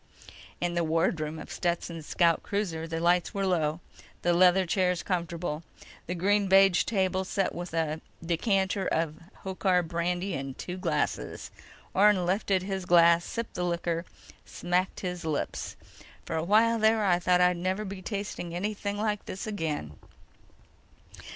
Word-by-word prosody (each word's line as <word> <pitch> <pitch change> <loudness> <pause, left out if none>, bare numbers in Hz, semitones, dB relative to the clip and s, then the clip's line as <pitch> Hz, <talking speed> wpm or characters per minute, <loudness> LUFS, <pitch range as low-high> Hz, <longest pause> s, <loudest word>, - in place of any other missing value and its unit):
In 175 0 -1
the 170 0 +1
wardroom 160 -1 0
of - - -9
Stetson's 170 -2 -3
scout 170 -3 +3
cruiser, 175 -6 -2
the 165 0 -3
lights 175 +2 +2
were 195 0 0
low, 165 -3 0 0.4
the 175 - +3
leather 185 +2 +5
chairs 180 0 +1
comfortable, 170 -3 -2 0.5
the 180 - -2
green 200 +3 +2
beige 195 -1 +5
table 190 -3 0
set 195 +1 -1
with 175 0 -6
a 160 -1 -1 0.2
decanter 190 +2 +1
of 160 -1 -1 0.2
Hochar 185 -1 +1
brandy 175 +3 -2
and 135 -3 -5
two 180 - -5
glasses. 185 - -2 0.4
Orne 195 -2 +4
lifted 190 0 +1
his 190 -1 -3
glass, 170 -1 +6
sipped 230 +4 -5
the 180 - -2
liquor, 170 -1 -1 0.4
smacked 180 +1 -1
his 180 -2 -4
lips. 155 -2 -3 0.5
"For - - -3
a 160 - 0
while 225 +5 +4
there, 220 0 +3
I 175 -2 +3
thought 180 0 +3
I'd 180 0 +4
never 185 +4 -1
be 195 -1 -6
tasting 195 -4 -4
anything 205 +2 -3
like 210 -1 -1
this 190 - -5
again." 160 - -3
180 Hz, 150 wpm, -28 LUFS, 170-195 Hz, 0.5 s, glass